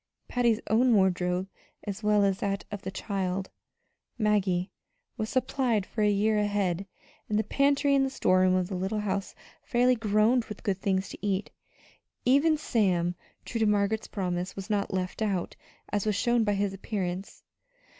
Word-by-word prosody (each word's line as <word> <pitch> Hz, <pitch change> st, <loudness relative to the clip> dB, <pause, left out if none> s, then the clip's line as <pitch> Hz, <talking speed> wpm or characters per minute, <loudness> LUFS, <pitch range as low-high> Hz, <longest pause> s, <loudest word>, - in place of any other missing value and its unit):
Patty's 235 Hz, -3 st, +2 dB
own 235 Hz, +2 st, +4 dB
wardrobe, 185 Hz, -1 st, +1 dB, 0.4 s
as 205 Hz, 0 st, -5 dB
well 210 Hz, -1 st, +3 dB
as 195 Hz, -1 st, +1 dB
that 200 Hz, 0 st, -2 dB
of 205 Hz, -1 st, -5 dB
the 190 Hz, -, -5 dB
child, 190 Hz, -1 st, -3 dB, 0.7 s
Maggie, 200 Hz, -4 st, +1 dB, 0.4 s
was 215 Hz, -, -3 dB
supplied 255 Hz, -5 st, 0 dB
for 215 Hz, -, -4 dB
a 210 Hz, -, +4 dB
year 210 Hz, +1 st, +2 dB
ahead; 200 Hz, -3 st, 0 dB, 0.4 s
and 210 Hz, -, +1 dB
the 215 Hz, -, +2 dB
pantry 280 Hz, +5 st, +2 dB
and 275 Hz, -1 st, +4 dB
the 270 Hz, -, 0 dB
storeroom 185 Hz, -6 st, +3 dB
of 185 Hz, -1 st, +1 dB
the 195 Hz, -, -6 dB
little 190 Hz, +4 st, -1 dB
house 200 Hz, -1 st, -3 dB, 0.3 s
fairly 250 Hz, +1 st, +3 dB
groaned 225 Hz, +2 st, +2 dB
with 210 Hz, -, -9 dB
good 195 Hz, -2 st, -1 dB
things 190 Hz, 0 st, 0 dB
to -, -, -11 dB
eat. 200 Hz, -1 st, -1 dB, 0.7 s
Even 285 Hz, +5 st, +4 dB
Sam, 185 Hz, -, +1 dB, 0.3 s
true 230 Hz, -, -3 dB
to 220 Hz, -, +3 dB
Margaret's 210 Hz, +1 st, +1 dB
promise, 180 Hz, -2 st, -3 dB
was 195 Hz, +2 st, -6 dB
not 200 Hz, -1 st, 0 dB
"left 185 Hz, +2 st, -3 dB
out," 200 Hz, -5 st, -1 dB, 0.4 s
as 205 Hz, 0 st, -1 dB
was 210 Hz, -, +1 dB
shown 240 Hz, +3 st, +2 dB
by 205 Hz, -1 st, +1 dB
his 200 Hz, 0 st, 0 dB
appearance. 195 Hz, -2 st, -4 dB
205 Hz, 165 wpm, -28 LUFS, 190-220 Hz, 0.7 s, own